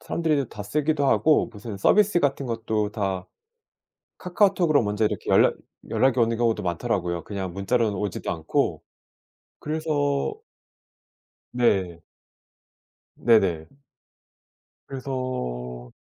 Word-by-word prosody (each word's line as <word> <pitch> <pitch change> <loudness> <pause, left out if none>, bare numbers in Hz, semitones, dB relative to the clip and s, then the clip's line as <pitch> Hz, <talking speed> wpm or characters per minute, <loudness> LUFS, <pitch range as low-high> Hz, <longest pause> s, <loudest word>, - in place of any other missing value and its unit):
사람들이 150 -6 -1
다 105 - -7
쓰기도 145 +5 0
하고 155 +3 +3
무슨 105 -1 -8
서비스 205 - +4
같은 140 -2 0
것도 110 -3 -2
다 95 -3 -2 0.9
카카오톡으로 180 - +2
먼저 105 +1 0
이렇게 105 - -2
연락 - - +5 0.4
연락이 130 -1 +2
오는 115 -1 +3
경우도 115 -3 +1
많더라고요, 85 -1 -2
그냥 95 -3 -5
문자로는 105 +3 0
오지도 100 -3 -3
않고. - - -1 0.8
그래서 155 +1 -4 1.6
네. 95 -9 +1 1.1
네네. 95 -9 +2 1.2
그래서 65 - -5
115 Hz, 245 characters per minute, -25 LUFS, 95-140 Hz, 1.6 s, 연락